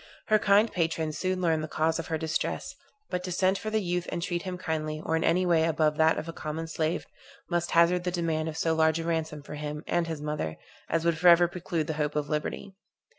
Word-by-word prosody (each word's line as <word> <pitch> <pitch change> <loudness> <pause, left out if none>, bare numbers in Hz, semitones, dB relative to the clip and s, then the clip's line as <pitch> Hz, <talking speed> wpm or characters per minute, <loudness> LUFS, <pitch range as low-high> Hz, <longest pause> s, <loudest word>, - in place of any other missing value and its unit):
Her 215 0 +5
kind 205 +2 +4
patrons 160 -3 -1
soon 185 0 -1
learned 160 -3 +1
the - - -3
cause 160 +1 0
of 165 - -5
her 160 - -1
distress; 160 0 -2 0.4
but 180 - -2
to 180 - -4
send 190 +2 +2
for 215 - -4
the 215 -1 0
youth 175 0 -1
and - - -2
treat 175 0 -2
him 185 0 -5
kindly, 155 -3 -3
or 160 - +1
in 160 - 0
any 180 +2 +3
way 170 -2 +3
above 155 -2 +1
that 160 0 +4
of 160 - -4
a 165 - -5
common 160 +1 -4
slave, 160 0 -2 0.5
must 175 0 0
hazard 170 +1 +4
the 180 - 0
demand 165 -3 -1
of 160 - -7
so 165 0 +1
large 160 0 +3
a - - -3
ransom 160 -3 -2
for 150 - -9
him 150 +1 -5
and 175 -1 0
his 160 -2 -4
mother, 150 - -3 0.3
as 165 0 0
would 165 -1 +2
forever 175 0 +7
preclude 170 -2 -3
the 160 - -2
hope 150 0 -1
of 150 -1 -1
liberty. 155 +5 -3
165 Hz, 235 wpm, -28 LUFS, 155-175 Hz, 0.5 s, forever